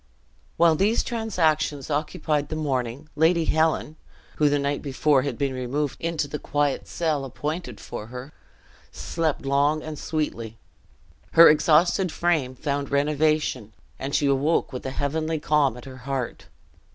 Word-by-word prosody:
While 170 Hz, -1 st, +5 dB
these 205 Hz, +8 st, +2 dB
transactions 160 Hz, -, 0 dB
occupied 150 Hz, -1 st, -1 dB
the 155 Hz, -, -3 dB
morning, 135 Hz, -2 st, -2 dB
Lady 165 Hz, +1 st, +3 dB
Helen 160 Hz, -1 st, +1 dB, 0.4 s
(who 150 Hz, -1 st, +4 dB
the 145 Hz, -, +2 dB
night 140 Hz, 0 st, -1 dB
before 140 Hz, 0 st, +2 dB
had 130 Hz, -3 st, -3 dB
been 140 Hz, -2 st, -1 dB
removed 130 Hz, +3 st, -2 dB
into 165 Hz, -3 st, -1 dB
the 145 Hz, +1 st, -5 dB
quiet 145 Hz, -1 st, -1 dB
cell 155 Hz, -4 st, -1 dB
appointed 140 Hz, -, -5 dB
for 105 Hz, -, -7 dB
her) 125 Hz, +4 st, -9 dB, 0.6 s
slept 160 Hz, -4 st, -2 dB
long 145 Hz, +3 st, +2 dB
and 155 Hz, -2 st, -6 dB
sweetly. 115 Hz, -8 st, -3 dB, 0.8 s
Her 165 Hz, 0 st, +9 dB
exhausted 165 Hz, +4 st, +3 dB
frame 155 Hz, -8 st, 0 dB
found 140 Hz, 0 st, -2 dB
renovation; 145 Hz, -5 st, 0 dB, 0.3 s
and 140 Hz, +1 st, -3 dB
she 145 Hz, -, +2 dB
awoke 140 Hz, +2 st, +1 dB
with 125 Hz, -, -5 dB
a -, -, -1 dB
heavenly 155 Hz, +4 st, -2 dB
calm 145 Hz, -5 st, +2 dB
at 125 Hz, -, -11 dB
her 130 Hz, -1 st, -10 dB
heart. 130 Hz, 0 st, -4 dB
145 Hz, 145 wpm, -25 LUFS, 135-155 Hz, 0.8 s, Her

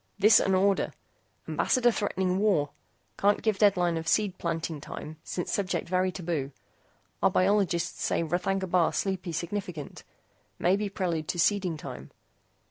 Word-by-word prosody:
THIS 210 Hz, +2 st, +7 dB
AN 190 Hz, -, +2 dB
ORDER. 195 Hz, +1 st, +2 dB, 0.5 s
AMBASSADOR 245 Hz, -2 st, +2 dB
THREATENING 190 Hz, -4 st, -1 dB
WAR. 185 Hz, -9 st, +2 dB, 0.5 s
CAN'T 205 Hz, +1 st, +2 dB
GIVE 215 Hz, -3 st, +1 dB
DEADLINE 180 Hz, -5 st, +3 dB
OF 160 Hz, 0 st, -5 dB
SEED 200 Hz, +2 st, +2 dB
PLANTING 165 Hz, -2 st, -3 dB
TIME 155 Hz, +1 st, -8 dB
SINCE 175 Hz, -, -4 dB
SUBJECT 190 Hz, -3 st, -1 dB
VERY 185 Hz, +1 st, +1 dB
TABOO. 165 Hz, -7 st, -3 dB, 0.7 s
OUR 195 Hz, -, +5 dB
BIOLOGISTS 185 Hz, -2 st, +1 dB
SAY -, -, +1 dB
R'THAGNA 185 Hz, +4 st, -1 dB
BAR 175 Hz, -2 st, +2 dB
SLEEPY 185 Hz, -3 st, -2 dB
SIGNIFICANT. 170 Hz, -1 st, -5 dB, 0.5 s
MAY 180 Hz, +2 st, +3 dB
BE 205 Hz, 0 st, -2 dB
PRELUDE 170 Hz, -5 st, -2 dB
TO -, -, -2 dB
SEEDING 185 Hz, -1 st, +1 dB
TIME. 70 Hz, -, -8 dB
185 Hz, 140 wpm, -28 LUFS, 165-200 Hz, 0.7 s, THIS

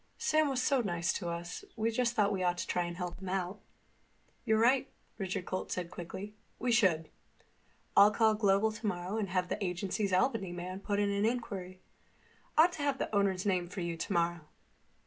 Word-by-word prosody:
"Sam 310 Hz, 0 st, +2 dB
was 260 Hz, -2 st, 0 dB
so 270 Hz, -1 st, +3 dB
nice 175 Hz, -4 st, 0 dB
to 175 Hz, -3 st, -3 dB
us 170 Hz, -, -5 dB
we 225 Hz, 0 st, 0 dB
just 240 Hz, +1 st, 0 dB
thought 210 Hz, -1 st, +3 dB
we 190 Hz, -, -2 dB
ought 175 Hz, -1 st, +1 dB
to -, -, -2 dB
try 175 Hz, -1 st, -1 dB
to 175 Hz, -, -6 dB
help 180 Hz, -1 st, -5 dB
him 190 Hz, -, -5 dB
out." 190 Hz, +1 st, -2 dB, 0.9 s
"You're 220 Hz, -, +3 dB
right," 250 Hz, +4 st, +3 dB, 0.3 s
Richard 185 Hz, -2 st, -3 dB
Holt 185 Hz, -, -3 dB
said 180 Hz, -1 st, -3 dB
quickly. 190 Hz, +4 st, -7 dB, 0.2 s
"We 245 Hz, +1 st, 0 dB
should. 185 Hz, -9 st, +3 dB, 0.9 s
I'll 200 Hz, +1 st, +9 dB
call 220 Hz, 0 st, +3 dB
Global 210 Hz, 0 st, +2 dB, 0.5 s
and 200 Hz, -3 st, -2 dB
have 180 Hz, 0 st, 0 dB
the -, -, -2 dB
agency's 190 Hz, +2 st, -1 dB
Albany 190 Hz, -1 st, +1 dB
man 180 Hz, +2 st, -5 dB
put 200 Hz, 0 st, -2 dB
in 205 Hz, 0 st, +2 dB
an 200 Hz, 0 st, 0 dB
inquiry. 200 Hz, -6 st, -2 dB, 0.8 s
Ought 330 Hz, +3 st, +7 dB
to 320 Hz, -, -6 dB
have 285 Hz, -2 st, +1 dB
the -, -, -3 dB
owner's 195 Hz, -2 st, +2 dB
name 180 Hz, -3 st, +1 dB
for 190 Hz, 0 st, -5 dB
you 170 Hz, -1 st, -2 dB
tomorrow." 170 Hz, +1 st, 0 dB
195 Hz, 185 wpm, -32 LUFS, 180-220 Hz, 0.9 s, I'll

